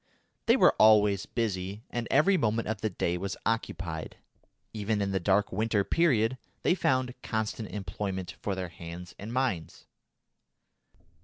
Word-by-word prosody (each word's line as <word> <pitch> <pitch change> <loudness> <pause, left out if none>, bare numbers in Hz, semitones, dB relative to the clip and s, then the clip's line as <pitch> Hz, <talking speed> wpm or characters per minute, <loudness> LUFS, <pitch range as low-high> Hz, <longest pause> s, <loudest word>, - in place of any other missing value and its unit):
They - - +6
were - - +6
always 105 -2 +5
busy, 100 -2 -2
and 120 -1 -3
every 155 +8 +4
moment 115 -7 +1
of 110 -1 -3
the 110 - 0
day 90 -2 -1
was 100 +1 -4
occupied. 85 -8 -3 0.6
Even 105 0 -1
in 100 -1 0
the 95 - +1
dark 100 +3 +2
winter 110 +1 +1
period 130 - +2 0.2
they - - +4
found 130 -8 +1
constant 110 0 -3
employment 95 -3 -4
for 100 - -1
their 90 -2 -4
hands 85 +1 -9
and 105 +3 -6
minds. 120 - -2
105 Hz, 145 wpm, -29 LUFS, 95-115 Hz, 0.6 s, They